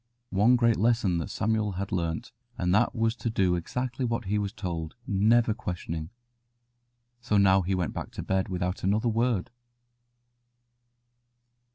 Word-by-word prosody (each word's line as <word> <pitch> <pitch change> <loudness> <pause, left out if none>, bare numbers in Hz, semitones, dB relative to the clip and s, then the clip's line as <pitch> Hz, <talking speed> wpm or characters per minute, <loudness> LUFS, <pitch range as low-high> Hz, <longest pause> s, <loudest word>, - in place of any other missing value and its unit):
'" 120 0 -49
One 105 +6 +4
great 115 -2 +3
lesson 105 -8 +1
Samuel 105 -1 0
had 95 +1 -4
learnt, 85 +5 -2 0.3
and 90 0 +1
that 110 +4 +3
was 115 0 +1
to 115 - -2
do 95 -5 +2
exactly 125 +9 -3
what 115 -2 -1
he 105 +2 0
was 100 -1 -2
told, 85 -7 -5
never 110 +3 +3
questioning. 85 -6 -5 1.1
So 120 -4 0
now 95 -1 +5
he 95 +2 -1
went 90 -5 -2
back - - -5
to - - -5
bed 95 0 0
without 90 0 -2
another 105 +5 +2
word. 115 -1 0
105 Hz, 150 wpm, -28 LUFS, 90-115 Hz, 1.1 s, now